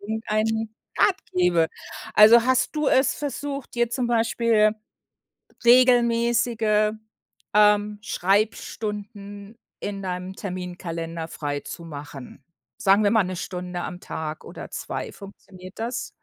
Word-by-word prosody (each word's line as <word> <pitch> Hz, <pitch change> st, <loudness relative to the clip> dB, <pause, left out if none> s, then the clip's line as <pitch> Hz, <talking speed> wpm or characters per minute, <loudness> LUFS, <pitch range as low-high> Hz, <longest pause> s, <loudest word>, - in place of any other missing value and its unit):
irgendeinen 220 Hz, +1 st, -2 dB, 0.2 s
Rat 385 Hz, -, +4 dB, 0.2 s
gebe. 175 Hz, -3 st, +3 dB, 0.5 s
Also, 225 Hz, +2 st, +8 dB
hast 260 Hz, +4 st, +1 dB
du 300 Hz, -2 st, +2 dB
es 265 Hz, +1 st, +3 dB
versucht, 285 Hz, -2 st, -5 dB
dir 240 Hz, 0 st, +1 dB
zum 250 Hz, -1 st, -1 dB
Beispiel 225 Hz, -2 st, +3 dB, 0.9 s
regelmäßige, 235 Hz, -3 st, +4 dB, 0.6 s
ähm, 210 Hz, 0 st, +4 dB
Schreibstunden 205 Hz, +1 st, -2 dB, 0.2 s
in 200 Hz, -1 st, -5 dB
deinem 180 Hz, 0 st, -4 dB
Terminkalender 170 Hz, -4 st, -5 dB
freizumachen. 145 Hz, -2 st, -7 dB, 0.3 s
Sagen 200 Hz, +2 st, +4 dB
wir 205 Hz, -, +3 dB
mal, 220 Hz, -3 st, +4 dB
1 185 Hz, 0 st, -4 dB
Stunde 180 Hz, 0 st, -5 dB
am 180 Hz, -1 st, -6 dB
Tag 155 Hz, -1 st, -6 dB
oder -, -, -9 dB
2, -, -, -5 dB
funktioniert 195 Hz, -1 st, -13 dB
das? 235 Hz, +2 st, -3 dB
210 Hz, 105 wpm, -24 LUFS, 180-230 Hz, 0.9 s, Also